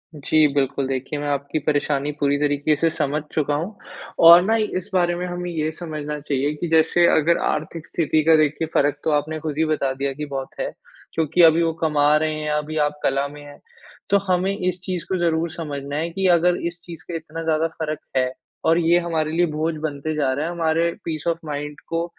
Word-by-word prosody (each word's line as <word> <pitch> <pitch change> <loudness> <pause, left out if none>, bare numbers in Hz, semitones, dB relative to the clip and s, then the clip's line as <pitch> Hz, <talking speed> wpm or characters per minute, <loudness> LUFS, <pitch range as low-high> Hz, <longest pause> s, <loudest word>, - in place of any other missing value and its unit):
जी 155 +1 +3
बिल्कुल, 135 -1 0
देखिए 135 +2 -3
मैं 145 - -3
आपकी 140 +2 -1
परेशानी 145 -1 0
पूरी 145 0 +2
तरीक़े 145 +1 +1
से 165 +3 +1
समझ 150 -1 -1
चुका 150 -2 0
हूँ। 175 +8 -4 0.5
और 170 +1 +10
ना 220 +2 +2 0.2
इस 185 - -6
बारे 175 -2 +2
में 180 +1 -3
हमें 175 0 -4
ये 155 -1 -1
समझना 155 -3 -5
चाहिए 145 0 -1
कि 175 - -4
जैसे, 160 +2 +4
अगर 165 +2 +3
आर्थिक 155 +1 -5
स्थिति 155 -2 +1
का 160 +1 +6
देखिए 155 +1 +1
फ़र्क 145 0 +2
तो 160 - +1
आपने 150 +2 0
खुद 155 -2 -4
ही 160 - +2
बता 155 -4 0
दिया 135 +1 -2
कि 150 +2 -5
बहुत 135 -2 -5
है, - - -2 0.4
क्योंकि 160 +2 +1
अभी 165 +1 +6
वो 165 - +1
कमा 150 -1 +3
रहे 155 0 0
हैं, 155 0 -3
अभी 150 +1 -2
आप 150 0 -8
कला 135 +1 +1
में 145 +1 -11
है। 145 0 -12 0.5
तो 200 - +5
हमें 185 +2 +1
इस 180 -1 -2
चीज़ 185 -3 -4
को 190 - +1
ज़रूर 165 0 +1
समझना 145 -4 -5
है 165 +2 -1
कि, 190 +2 0
अगर 175 0 +4
इस 170 0 -8
चीज़ 165 -3 -10
के 170 - -5
इतना 165 0 -7
ज़्यादा 160 0 +1
फ़र्क 155 -1 -2 0.2
है 130 0 +1 0.3
और 165 +1 +4
ये 170 0 +4
हमारे 160 -3 -1
लिए 175 +2 +2
बोझ 160 +2 0
बनते 155 0 -3
जा 140 -3 +1
रहा 145 +3 -2
है, 170 - -3
हमारे 165 0 +1
पीस 160 -1 -4
ऑफ़ 165 -1 +1
माइंड 150 0 -5
को 165 0 -1
155 Hz, 215 wpm, -22 LUFS, 145-165 Hz, 0.5 s, और